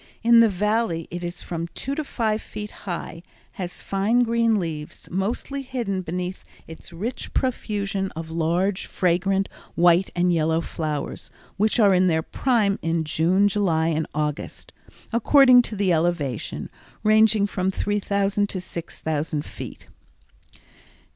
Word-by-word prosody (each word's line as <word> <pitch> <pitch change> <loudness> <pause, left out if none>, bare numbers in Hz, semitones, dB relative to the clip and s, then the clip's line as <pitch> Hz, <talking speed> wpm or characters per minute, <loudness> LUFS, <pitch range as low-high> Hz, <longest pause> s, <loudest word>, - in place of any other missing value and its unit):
In 235 0 +7
the 230 -1 +6
Valley 205 -3 0
it 175 +1 -5
is 175 -1 -5
from 170 -1 -4
two 275 - -3
to 310 +2 -2
five 220 -6 -1
feet 210 0 -7 0.2
high, 170 -1 -4 0.3
has 180 -2 -6
fine 210 +5 +2
green 230 -1 +2
leaves, 160 -5 -5
mostly 220 +9 -2
hidden 240 -8 -3
beneath 180 +2 -4 0.2
its 160 - -11
rich 220 +10 -5
profusion 200 -6 -1
of 160 0 -6
large, 170 +4 0
fragrant 190 +2 +1 0.3
white 175 +2 +4
and 175 0 +2
yellow 160 0 +2
flowers, 155 -3 -4 0.3
which 215 +4 +2
are 205 -3 +6
in 185 0 +4
their 160 -2 +2
prime 220 -5 +1
in 165 0 0
June, 170 +6 +2
July 170 -6 +1
and 160 -1 -1
August, 150 -1 -4 0.4
according 255 +1 +7
to 230 - -5
the 195 -3 +2
elevation, 160 -7 -1 0.3
ranging 215 -1 +5
from 190 -2 -1
3000 200 0 0
to 185 - -3
6000 160 -4 -4
feet. - - -9
190 Hz, 135 wpm, -24 LUFS, 165-215 Hz, 0.4 s, In